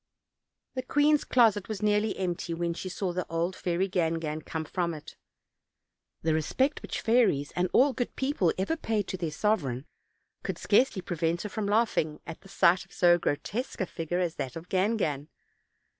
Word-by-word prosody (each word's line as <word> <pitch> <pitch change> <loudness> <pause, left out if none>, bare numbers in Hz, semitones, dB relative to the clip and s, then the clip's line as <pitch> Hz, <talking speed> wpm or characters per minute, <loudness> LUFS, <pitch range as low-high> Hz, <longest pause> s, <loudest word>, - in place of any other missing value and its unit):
The 255 - -2
queen's 290 +3 +3
closet 220 -5 +3
was 210 -2 -4
nearly 210 0 +2
empty, 175 -2 -2
when 170 0 -1
she 185 +2 -6
saw 180 0 -2
the 180 0 -3
old 170 +3 -1
fairy 180 +2 0
Gangan 165 -4 -1
come 160 0 -4
from 170 +1 -2
it. 150 - -11 1.1
The 160 0 +2
respect 260 - 0
which - - -4
fairies 220 - +3
and 180 0 +1
all 270 +1 +5
good 245 - -3
people 265 - +1
ever 195 +12 0
pay 220 -9 -1
to 190 - -5
their 170 -3 -2
sovereign 150 - 0 0.6
could - - -4
scarcely 205 -3 +2
prevent 170 -1 -1
her 210 - -4
from 210 0 -3
laughing 205 -8 +1
at 165 - -8
the 195 - -16
sight 180 -1 +4
of - - -23
so 175 -1 +4
grotesque 210 - -3
a 190 - +1
figure 165 0 -3
as 175 -3 -1
that 130 - -4
of 165 +2 -8
Gangan. 185 -8 0
185 Hz, 175 wpm, -28 LUFS, 165-215 Hz, 1.1 s, all